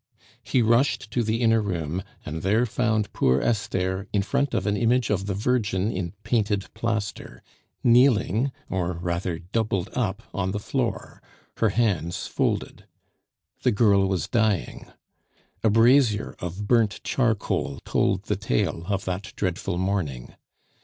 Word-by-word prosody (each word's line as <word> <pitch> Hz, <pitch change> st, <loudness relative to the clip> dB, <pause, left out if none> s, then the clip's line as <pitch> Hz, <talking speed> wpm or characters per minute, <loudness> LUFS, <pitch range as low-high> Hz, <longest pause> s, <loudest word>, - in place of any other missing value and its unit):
He 125 Hz, -, +1 dB
rushed 115 Hz, -1 st, +2 dB
to 120 Hz, -, +1 dB
the 110 Hz, +1 st, -1 dB
inner 115 Hz, -1 st, +4 dB
room, 90 Hz, -3 st, -2 dB, 0.2 s
and 80 Hz, +1 st, -5 dB
there 105 Hz, +7 st, +2 dB
found 110 Hz, -2 st, 0 dB
poor 65 Hz, +1 st, +3 dB
Esther 95 Hz, -2 st, -1 dB
in 100 Hz, -2 st, +1 dB
front 140 Hz, +5 st, 0 dB
of 95 Hz, -, 0 dB
an 105 Hz, 0 st, +1 dB
image 120 Hz, +2 st, +2 dB
of 100 Hz, -1 st, -1 dB
the 100 Hz, -, -1 dB
Virgin 110 Hz, -2 st, 0 dB
in 90 Hz, -3 st, -4 dB
painted 105 Hz, -3 st, 0 dB
plaster, 110 Hz, -3 st, -3 dB, 0.4 s
kneeling, 120 Hz, 0 st, +4 dB, 0.2 s
or 90 Hz, -2 st, -1 dB
rather 85 Hz, 0 st, -2 dB
doubled 95 Hz, +1 st, -2 dB
up, 110 Hz, -3 st, -2 dB
on 95 Hz, -1 st, -1 dB
the 105 Hz, -, -2 dB
floor, -, -, -3 dB, 0.4 s
her 110 Hz, -, +3 dB
hands 95 Hz, -6 st, 0 dB
folded. -, -, -2 dB, 0.7 s
The 125 Hz, -, +3 dB
girl 100 Hz, -3 st, +4 dB
was 95 Hz, -3 st, -1 dB
dying. 110 Hz, -, 0 dB, 0.8 s
A 110 Hz, -, +4 dB
brazier 115 Hz, 0 st, +4 dB
of 90 Hz, +4 st, -5 dB
burnt 115 Hz, -4 st, +2 dB
charcoal 110 Hz, -, 0 dB
told -, -, +1 dB
the -, -, -1 dB
tale 80 Hz, +6 st, -1 dB
of 100 Hz, -1 st, -1 dB
that 95 Hz, +2 st, -4 dB
dreadful 90 Hz, -1 st, -2 dB
morning. 90 Hz, -10 st, -2 dB
105 Hz, 140 wpm, -25 LUFS, 95-115 Hz, 0.8 s, inner